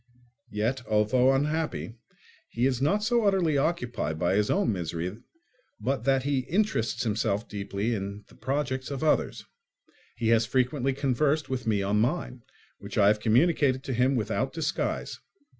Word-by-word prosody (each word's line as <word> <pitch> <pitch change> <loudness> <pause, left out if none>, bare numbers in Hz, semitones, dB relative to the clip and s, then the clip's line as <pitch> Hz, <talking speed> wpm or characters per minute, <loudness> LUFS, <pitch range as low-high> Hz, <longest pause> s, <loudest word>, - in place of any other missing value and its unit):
Yet, 115 +5 -1
although 110 +5 +3
unhappy, 150 -2 -1 0.6
he 120 +2 0
is 130 -2 0
not 200 +9 +2
so 235 +1 +2
utterly 190 -7 +2
occupied 125 - -1
by 85 +3 +1
his 105 +1 +2
own 195 - +2
misery 90 +3 -4 0.6
but 135 0 -2
that 135 -1 +2
he 140 -1 +1
interests 180 - 0
himself 105 -1 -1
deeply 100 +2 -3
in 100 0 -5
the - - -20
projects 130 0 -2
of 140 0 -4
others. 155 - +1 0.7
He 115 -2 -1
has 115 -1 +3
frequently 130 +2 +1
conversed 140 +3 0
with 125 -3 -3
me 105 -3 +1
on 105 +2 +1
mine, 125 -1 -1 0.4
which - - -8
I 100 - +6
have 105 0 +2
communicated 130 +3 +2
to 135 - -3
him 125 +3 +2
without 125 +3 -1
disguise. 160 -2 -2
125 Hz, 155 wpm, -27 LUFS, 110-145 Hz, 0.7 s, I